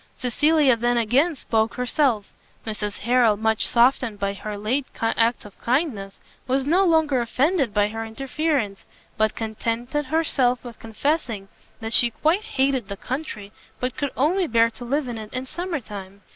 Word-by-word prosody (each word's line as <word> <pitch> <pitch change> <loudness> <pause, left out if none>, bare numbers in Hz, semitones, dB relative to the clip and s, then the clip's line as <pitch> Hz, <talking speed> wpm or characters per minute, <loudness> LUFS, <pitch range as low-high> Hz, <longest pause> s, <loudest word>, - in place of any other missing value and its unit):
Cecilia 290 +2 +3
then 240 +1 +1
again 265 +9 +2
spoke 225 -3 0
herself. 250 -4 0 0.3
Mrs 210 -2 -4
Harrel, 235 -2 +3
much 220 0 +1
softened 240 -2 +3
by 200 0 -1
her 210 +1 -6
late 250 +7 -1
acts 230 +1 +1
of 205 - -14
kindness, 235 -7 -1 0.3
was 265 +1 +1
no 350 +7 +3
longer 320 -7 +3
offended 270 - +1
by 205 0 +2
her 225 +1 -4
interference, 260 -2 -2 0.4
but 215 0 +1
contented 230 +6 -2
herself 260 -5 +1
with 240 -2 -10
confessing 225 -3 -2 0.3
that 225 0 -3
she 240 - +6
quite 315 - +1
hated 265 - 0
the 200 - -6
country, 245 -7 -5 0.3
and 250 0 -2
could 285 - -2
only 340 +7 +2
bear 230 0 +3
to 245 - -10
live 275 +3 -1
in 235 -2 -5
it 215 -1 -9
in 255 +1 -3
summer 345 +3 -4
time. 200 -3 -10
240 Hz, 160 wpm, -23 LUFS, 220-280 Hz, 0.4 s, she